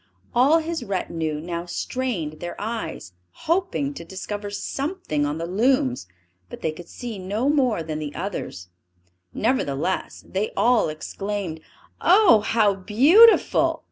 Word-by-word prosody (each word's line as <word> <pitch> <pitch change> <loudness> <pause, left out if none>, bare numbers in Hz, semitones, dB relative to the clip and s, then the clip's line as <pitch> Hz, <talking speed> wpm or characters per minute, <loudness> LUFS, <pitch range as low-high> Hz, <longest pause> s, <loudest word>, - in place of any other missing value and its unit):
All 270 +7 +5
his 330 +1 -3
retinue 165 -5 -2
now 170 +2 -5
strained 175 -8 -3
their 175 - -6
eyes, 220 - -5 0.2
hoping 335 -5 -1
to 280 - -8
discover 205 +3 -6
something 205 - -2
on 145 +1 -3
the 165 - -3
looms, 185 - +1 0.4
but - - -9
they 160 - 0
could 170 +2 -11
see 235 -5 -7
no 205 +8 -1
more 255 - +2
than 155 -1 -4
the 150 -1 -6
others; 165 - -5 0.6
nevertheless, 185 - -1
they 200 +3 -2
all 240 -7 +3
exclaimed, 185 +2 -4 0.4
"Oh, 365 - +6
how 215 -1 +2
beautiful!" 275 - +5
205 Hz, 130 wpm, -23 LUFS, 165-255 Hz, 0.6 s, Oh